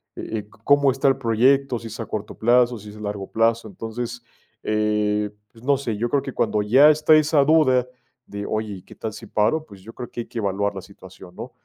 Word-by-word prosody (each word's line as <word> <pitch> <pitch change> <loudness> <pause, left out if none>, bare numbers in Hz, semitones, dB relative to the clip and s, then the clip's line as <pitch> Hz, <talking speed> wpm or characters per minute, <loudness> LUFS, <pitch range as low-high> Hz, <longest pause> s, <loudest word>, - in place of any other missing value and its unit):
eh, 110 - -5
eh, 105 0 -11
cómo 145 +1 +4
está 135 +1 +2
el 135 - +1
proyecto, 130 +2 +2
si 115 - -9
es 110 +2 -9
a 115 - -3
corto 105 -1 -6
plazo, 120 +1 +3
si 105 - -11
es 105 - -13
a - - -11
largo 105 -2 -5
plazo, 115 0 +1
entonces, 115 +3 -6 0.4
eh, 105 -1 0 0.2
pues 115 - -18
no 140 0 +4
sé, 115 -6 -3
yo 120 +2 -1
creo 140 - +1
que 135 - -6
cuando 105 -2 0
ya 130 +8 +6
está 155 +1 +4
esa 150 -2 +4
duda 135 -5 +4 0.4
de, 100 0 -6
¿oye, 110 -1 -3
y 90 - -12
qué - - -15
tal 110 - -5
si - - -10
paro?, 115 +10 +1
pues 100 -6 -15
yo 115 - -10
creo 125 - -8
que 120 - -5
hay - - -9
que 120 - -10
evaluar 100 0 -1
la 95 - -5
situación, 95 -2 -15
¿no?, - - -8
115 Hz, 235 wpm, -22 LUFS, 105-130 Hz, 0.4 s, ya